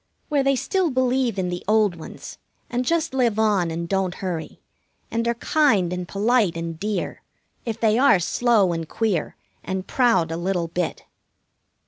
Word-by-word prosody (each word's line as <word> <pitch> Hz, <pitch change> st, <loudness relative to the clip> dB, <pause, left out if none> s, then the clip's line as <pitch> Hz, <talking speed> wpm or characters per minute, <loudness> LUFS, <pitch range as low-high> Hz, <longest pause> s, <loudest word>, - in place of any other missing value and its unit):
Where 290 Hz, -2 st, +2 dB
they 275 Hz, 0 st, +2 dB
still 370 Hz, +6 st, 0 dB
believe 255 Hz, -4 st, +1 dB
in 185 Hz, -2 st, -1 dB
the 175 Hz, 0 st, -4 dB
old 210 Hz, -3 st, +3 dB
ones, 165 Hz, -, -10 dB, 0.3 s
and 245 Hz, +1 st, 0 dB
just 330 Hz, +2 st, 0 dB
live 240 Hz, -5 st, +1 dB
on 205 Hz, -6 st, +2 dB
and 170 Hz, +1 st, -4 dB
don't 190 Hz, -1 st, -1 dB
hurry, 175 Hz, -4 st, -5 dB, 0.5 s
and 230 Hz, 0 st, -1 dB
are 235 Hz, -, +1 dB
kind 225 Hz, -, +2 dB
and 180 Hz, -1 st, -4 dB
polite 205 Hz, -3 st, +1 dB
and 165 Hz, -1 st, -5 dB
dear, 210 Hz, +1 st, -3 dB, 0.4 s
if 230 Hz, -2 st, -3 dB
they 220 Hz, 0 st, +3 dB
are 270 Hz, -8 st, +5 dB
slow 205 Hz, 0 st, +2 dB
and 165 Hz, -1 st, -4 dB
queer 210 Hz, -8 st, -1 dB, 0.3 s
and 190 Hz, 0 st, -3 dB
proud 190 Hz, -11 st, +2 dB
a 165 Hz, -, -2 dB
little 175 Hz, -1 st, -1 dB
bit. 175 Hz, 0 st, -3 dB
205 Hz, 165 wpm, -23 LUFS, 175-245 Hz, 0.5 s, are